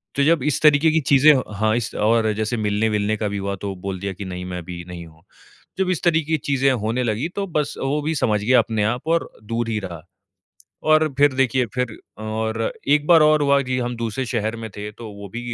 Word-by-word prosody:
तो 140 - +2
जब 160 -3 +3
इस 150 -2 0
तरीके 150 +1 +5
की 160 - +3
चीज़ें 140 +2 +6
हो 130 - +1
हाँ, 110 +2 +1 0.3
और 110 +1 +3
जैसे 110 +3 -2
मिलने-विलने 105 0 0
का 105 - -2
भी 100 0 -3
हुआ 100 0 -3
तो 100 -1 -3
बोल 95 0 -5
दिया 100 0 -3
की 100 +2 -8
नहीं 90 -1 -6
मैं 90 -1 -5
अभी 85 0 -7
नहीं 85 -1 -8
हूँ। 80 0 -18 0.6
जब 190 -1 0
इस 180 - -1
तरीके 160 -2 +1
की 160 - +3
चीज़ें 135 -1 +2
होने 120 +1 -1
लगीं 120 +8 -1
तो 200 -1 -1
बस 150 -2 0
वो 145 +2 0
भी 155 +2 -1
समझ 105 -6 +1
गया 125 +2 +5
अपने 110 -2 0
आप 120 +7 -2
और 170 - 0
दूर 115 +2 -2
ही 110 -2 -1
रहा। 85 -5 -7 0.9
और 155 0 +5
फिर 145 -1 +5
देखिए 130 -1 +1
फिर 125 -3 -2 0.3
और 110 +1 -2 0.3
1 150 +1 +3
बार 170 -2 +7
और 150 0 +4
हुआ 140 0 +4
की 130 -1 -2
हम 120 -1 -2
दूसरे 115 +3 -3
शहर 110 0 -2
में 115 0 -6
थे 105 +1 -5
तो 115 0 -10
वो 100 0 -9
भी 120 - -4
115 Hz, 230 wpm, -22 LUFS, 105-140 Hz, 0.9 s, बार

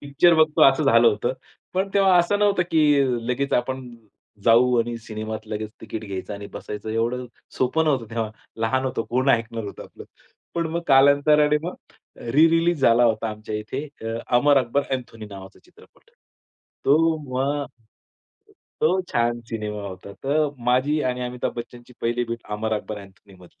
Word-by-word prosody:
Picture 145 +5 +3
बघतो 155 -1 +3
असं 135 +3 +4
झालं 115 -3 +5
होतं, 110 +3 -1 0.4
पण 190 +1 0
तेव्हा 195 -2 +5
असं 175 +4 +2
नव्हतं, 205 -3 +3
की 150 -3 +4 0.3
लगेच 140 +3 -1
आपण 130 +1 -1 0.6
जाऊ 120 +2 +5
आणि 120 0 -3
सिनेमात 110 -1 -6
लगेच 110 0 -4
तिकीट 110 0 -6
घ्यायचं 100 0 -6
आणि 100 0 -8
बसायचं 105 +1 -7
एवढं 120 +3 -1 0.3
सोपं 145 +6 +1
नव्हतं 130 -8 0
तेव्हा. 115 -2 -2 0.3
लहान 130 +4 0
होतो 130 -3 -2
कोण 130 +3 +1
ऐकणार 115 -2 0
होतं 100 - -8
आपलं. - - -13 0.5
पण 170 -1 0
मग 170 - -2
कालांतराने 145 +2 +5
मग 175 +2 -4 0.4
रि-रिलीज 165 +6 +3
झाला 120 -1 +5
होता 110 -1 +1
आमच्या 105 0 -7
इथे 130 +7 -5 0.2
अ, 115 0 -3 0.2
अमर 145 +3 +4
अकबर-अँथोनी 125 -3 -3
नावाचा 95 -2 -11
चित्रपट. - - -22 0.7
तो 160 +3 +4
मग, 140 +3 -1 1.1
तो 180 +4 +3
छान 120 0 +1
सिनेमा 105 -2 -4
होता. 95 +1 -10
तर 150 +2 +2 0.2
माझी 130 +5 +2
आणि 125 -1 -1
अमिताभ 125 0 -3
बच्चनची 120 +1 -9
पहिली 120 +1 0
भेट 115 0 -6
अमर-अकबर-अँथोनी 105 -2 -5
मधली. 90 - -19
125 Hz, 150 wpm, -23 LUFS, 110-145 Hz, 1.1 s, झालं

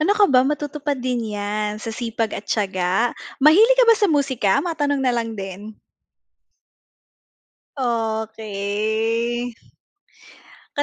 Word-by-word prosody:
Ano 350 +7 +3
ka 415 - +6
ba, 255 - +7
matutupad 295 -1 -2
din 240 -4 -3
yan 210 +1 -2
sa 225 +1 -6
sipag 230 -1 -3
at 205 - -7
tiyaga. 195 +2 0 0.2
Mahilig 405 - +6
ka - - +6
ba 460 - +7
sa 415 -3 +2
musika? 270 - +1
Matanong 290 -4 -1
na 250 - +2
lang 230 -2 -2
din. 200 +2 -8 2.0
Okey. 220 0 -2 1.2
Ka - - +4
230 Hz, 115 wpm, -21 LUFS, 215-285 Hz, 2.0 s, ba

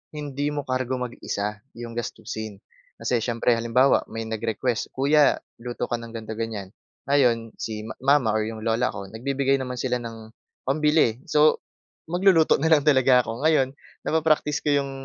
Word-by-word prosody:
hindi 145 -1 -3
mo 145 -1 -2
kargo 130 -1 -1
mag-isa 105 -4 -4 0.2
yung 120 0 -7
gastusin. 110 -3 -6 0.3
Kasi 125 - 0
siyempre, 115 +1 0
halimbawa 115 +4 +3
may 115 0 -5
nag-request, 115 +1 -2
"Kuya 145 +2 +4 0.2
luto 120 0 -4
ka 120 - 0
ng 115 0 -10
gan'to-ganyan." 110 -3 -5 0.3
Ngayon 120 -5 +2
si 105 -1 -4
ma 110 - -7 0.3
mama 125 -6 0
or 110 - +1
yung 110 -1 -6
lola 115 +2 +1
ko 95 0 -7
nagbibigay 135 +3 0
naman 125 -1 -4
sila 125 0 -1
ng 115 -2 -9 0.3
pambili. 150 -4 +2
So, 150 +1 +4 0.5
magluluto 175 -1 +4
na 160 - +2
lang 150 -2 +4
talaga 130 -3 +5
ako. 115 +5 -5
Ngayon 140 -4 +3 0.3
napapraktis 155 -2 +1
ko 150 - +1
yung 140 -1 +1
125 Hz, 155 wpm, -24 LUFS, 115-140 Hz, 0.5 s, talaga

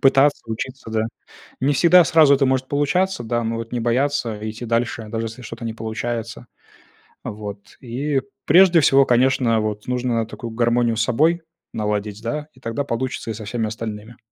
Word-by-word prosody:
пытаться 135 +2 +4
учиться. 115 +2 -6
Да. 110 0 0 0.6
Не 140 +3 +2
всегда 175 +4 +6
сразу 150 -2 +6
это 135 -1 +2
может 130 0 0
получаться, 160 +3 0
да, 120 +1 -1
но 115 0 -1
вот 115 +1 -6
не 120 - -1
бояться 120 -1 0
идти 110 +3 -7
дальше, 115 0 -1
даже 115 +1 -3
если 115 +3 -8
что-то 115 0 -8
не 115 -1 -3
получается. 115 +1 -4 0.8
Вот. 105 -1 -8
И 135 +3 -1 0.2
прежде 175 +2 +6
всего, 135 -1 +5
конечно, 125 -2 +3
вот 105 0 -4
нужно 125 -2 0
такую 115 +1 -8
гармонию 120 0 +1
с 115 - +2
собой 155 +9 +2 0.3
наладить, 105 0 -2
да, 150 +6 -3
и 125 - -21
тогда 115 +3 -3
получится 125 -2 -3
и - - -3
со 110 0 -8
всеми 110 +1 -2
остальными. 110 +1 -6
120 Hz, 170 wpm, -21 LUFS, 110-135 Hz, 0.8 s, всегда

